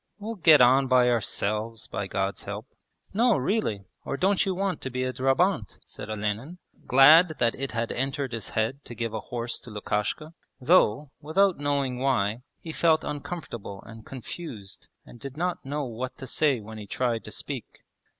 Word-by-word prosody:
We'll 215 +2 -5
get 160 - +6
on 130 +2 +6
by 125 -1 +5
ourselves 110 0 -1
by 100 - -4
God's 95 +1 -2
help.' - - -5 0.5
'No, 230 +2 +4
really! 130 - -1 0.2
Or 140 - -3
don't 195 +3 +3
you 190 - 0
want 190 -2 -1
to 130 - -4
be 130 0 -2
a 130 0 -2
drabant?' 135 - +1
said - - -9
Olenin, 110 - -3 0.3
glad 155 +6 +7
that 120 -1 +2
it 135 0 -3
had 115 -1 -1
entered 135 0 -2
his 115 -2 -4
head 120 +6 0
to 120 - -8
give 115 -1 -3
a 110 - -2
horse 120 +2 -4
to - - -12
Lukashka, 105 +8 -2 0.3
though, 140 -3 +3
without 175 +4 +2
knowing 140 -3 0
why, 120 -4 +1 0.2
he 165 - -6
felt 160 0 +3
uncomfortable 140 - -6
and 115 -1 -11
confused 120 - -8 0.2
and 120 - -14
did 140 +2 -8
not 180 +1 -2
know 145 +2 -3
what 125 +2 -5
to 130 - -7
say 140 0 +1
when 110 +1 -9
he 105 - -9
tried 120 +1 -1
to - - -8
speak. - - -7
130 Hz, 180 wpm, -27 LUFS, 115-155 Hz, 0.5 s, glad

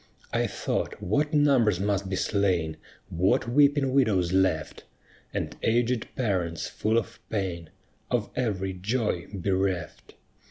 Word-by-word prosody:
I - - +2
thought - - -3
what 145 +11 0
numbers 135 - +4
must 100 -1 0
be 95 - -1
slain, 90 -7 0 0.3
What 90 +7 +1
weeping 140 +1 +3
widows 100 -10 +2
left! 95 -5 +1 0.5
And - - -3
aged 120 +1 +1
parents 90 -9 -1
full 110 +2 0
of 115 - -2
pain, 90 -6 -3 0.4
Of 120 -4 -1
every 95 -6 -1
joy 100 -1 -1
bereft. 95 -3 -2
100 Hz, 120 wpm, -27 LUFS, 90-120 Hz, 0.5 s, numbers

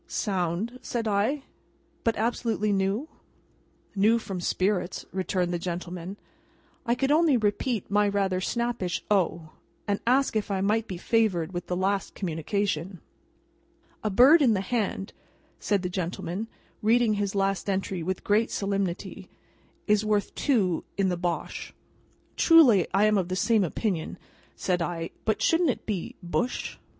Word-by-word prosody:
'" - - -38
"Sound," 195 +4 -2
said 230 -2 -3
I; 215 +8 +1 0.6
"but, 230 - +1
absolutely 220 -2 0
new?" 195 +8 0 0.9
"New 215 +4 +4
from 195 -5 -5
spirits," 185 0 -1
returned 185 -1 -1
the 175 - -1
gentleman. 180 +2 -5 0.7
I 235 - +3
could 270 +3 0
only 310 -3 +4
repeat 215 0 -1
my 205 0 +3
rather 195 -2 0
snappish 235 -6 -2
"O!" 170 -5 +1 0.4
and 205 -1 0
ask 265 0 +3
if 215 -1 -1
I 195 -1 0
might 215 +3 +1
be 185 - -5
favoured 190 -5 +1
with 175 0 -4
the 180 - -1
last 195 +1 -1
communication. 180 0 -2 1.0
"'A 215 - +1
bird 265 - +7
in 240 -6 +4
the 190 - 0
hand,'" 200 -2 -2 0.5
said 200 -2 0
the - - 0
gentleman, 180 +3 -3 0.3
reading 230 +1 +3
his 205 -1 -2
last 195 0 0
entry 190 -2 -1
with 185 +3 -3
great 215 +3 +2
solemnity, 195 -3 -3 0.6
"'is 210 0 +3
worth 210 -1 0
two 200 - +1
in 195 -1 +2
the 180 - 0
Bosh.'" 175 -1 -4 0.6
"Truly 265 - +6
I 195 +3 +3
am 210 -1 +3
of 180 - -2
the 185 - -2
same 220 +2 +3
opinion," 180 -1 -2 0.4
said 180 -2 -1
I; 165 -1 -3
"but 220 - 0
shouldn't 330 -1 +3
it 250 - -2
be 200 -6 -3
Bush?" 240 +8 -2
200 Hz, 150 wpm, -27 LUFS, 180-225 Hz, 1.0 s, bird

